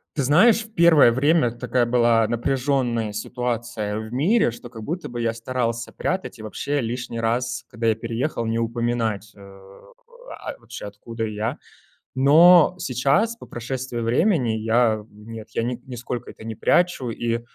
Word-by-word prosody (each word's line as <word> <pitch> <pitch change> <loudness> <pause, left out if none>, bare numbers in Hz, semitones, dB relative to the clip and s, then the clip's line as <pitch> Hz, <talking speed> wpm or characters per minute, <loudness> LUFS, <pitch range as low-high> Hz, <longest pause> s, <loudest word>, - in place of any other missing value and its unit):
Ты 140 - 0
знаешь, 215 - +5
в 220 - -19
первое 165 - +6
время 145 0 +3
такая 120 +1 0
была 120 -2 +3
напряжённая 120 -2 0
ситуация 115 -1 -3
в 110 +1 -6
мире, 165 - +2
что 120 +1 -11
как 110 -3 -10
будто 175 +7 -4
бы 120 -1 -5
я 115 -1 0
старался 115 -1 -3
прятать 185 -8 -3
и 110 - -10
вообще 140 +6 -2
лишний 115 0 -4
раз, 120 +2 -1
когда 115 +1 -3
я 110 - +3
переехал, 115 +2 -3
не 115 +1 -1
упоминать, 115 -3 -2
э, - - -19
а, 465 - -12
вообще 115 -2 -9
откуда 115 +3 -7
я, 110 +1 -3 0.6
но 165 +6 +6
сейчас, 145 - +1
по - - -13
прошествии 125 0 -5
времени, 125 - +2
я, 110 0 +1
нет, 110 +1 -10
я 115 - -1
ни 120 +1 -3
нисколько 125 -1 -6
это - - -14
не 110 -1 -5
прячу, 175 -9 +1
и 115 0 -2
120 Hz, 155 wpm, -23 LUFS, 115-140 Hz, 0.6 s, первое